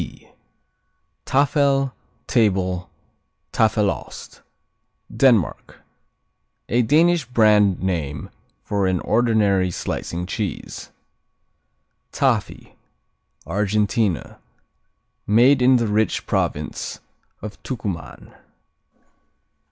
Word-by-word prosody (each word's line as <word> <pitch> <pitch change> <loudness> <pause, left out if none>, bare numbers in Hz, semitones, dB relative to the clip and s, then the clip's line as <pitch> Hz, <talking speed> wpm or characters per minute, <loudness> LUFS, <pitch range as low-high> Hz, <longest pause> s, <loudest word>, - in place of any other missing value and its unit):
T - - -10 1.0
Taffel, 140 -1 +2 0.3
Table, 95 -5 0 0.6
Taffelost 105 -2 -1 0.7
Denmark 115 - +2 0.9
A 120 - +3
Danish 160 +5 +3
brand 105 -6 +3
name 80 -6 -3 0.3
for 100 -2 0
an 90 -1 0
ordinary 105 -5 +2
slicing 85 0 -4
cheese. 100 +1 -5 1.2
Tafi - - -1 0.7
Argentina 105 - -1 0.9
Made 125 +6 +5
in 130 +1 +5
the 120 -2 +2
rich 105 -1 0
province - - -2 0.4
of 105 -1 -8
Tucuman. 95 - -6
105 Hz, 70 wpm, -21 LUFS, 95-125 Hz, 1.2 s, Made